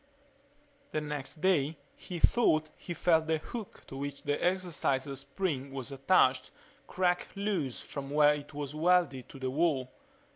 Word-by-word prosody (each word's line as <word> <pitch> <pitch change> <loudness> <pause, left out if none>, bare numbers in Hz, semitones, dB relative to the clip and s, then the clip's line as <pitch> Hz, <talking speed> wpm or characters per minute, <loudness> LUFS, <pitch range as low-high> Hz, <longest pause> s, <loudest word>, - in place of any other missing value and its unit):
The 155 - +1
next 150 0 -4
day 160 -5 +2 0.2
he 180 - -7
thought 155 -6 +3
he - - -9
felt 160 -2 +3
the 160 0 +2
hook 215 +6 -8
to - - -10
which 140 0 -5
the 145 - -1
exerciser 160 -7 0
spring 140 0 -3
was 135 0 -5
attached 135 -2 +3 0.4
crack 180 -1 +1
loose 195 - -1
from 140 -1 -6
where 150 0 +5
it 145 0 -7
was 145 -1 -5
welded 165 -5 +2
to - - -10
the 130 -1 -2
wall. 140 -4 +1
150 Hz, 150 wpm, -31 LUFS, 135-175 Hz, 0.4 s, where